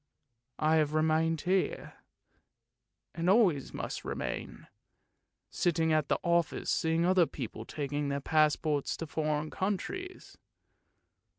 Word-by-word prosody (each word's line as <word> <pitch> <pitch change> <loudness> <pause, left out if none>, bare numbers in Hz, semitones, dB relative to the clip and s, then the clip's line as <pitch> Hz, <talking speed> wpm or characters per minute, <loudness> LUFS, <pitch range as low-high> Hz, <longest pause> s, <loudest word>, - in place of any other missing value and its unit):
I 155 +1 +3
have 155 -1 +1
remained 160 0 +2
here, 185 +1 -1 1.2
and 170 +2 -1
always 190 - +3
must - - -5
remain, - - -5 0.9
sitting 165 -2 +1
at 155 -2 +2
the - - +1
office 170 -1 +1
seeing 165 +1 +1
other 180 -2 +4
people 115 -4 -7
taking 145 +1 -3
their 140 0 -1
passports 155 -1 +1
for 165 - -5
foreign 155 0 -2
countries. 370 - -4
160 Hz, 110 wpm, -31 LUFS, 150-170 Hz, 1.2 s, other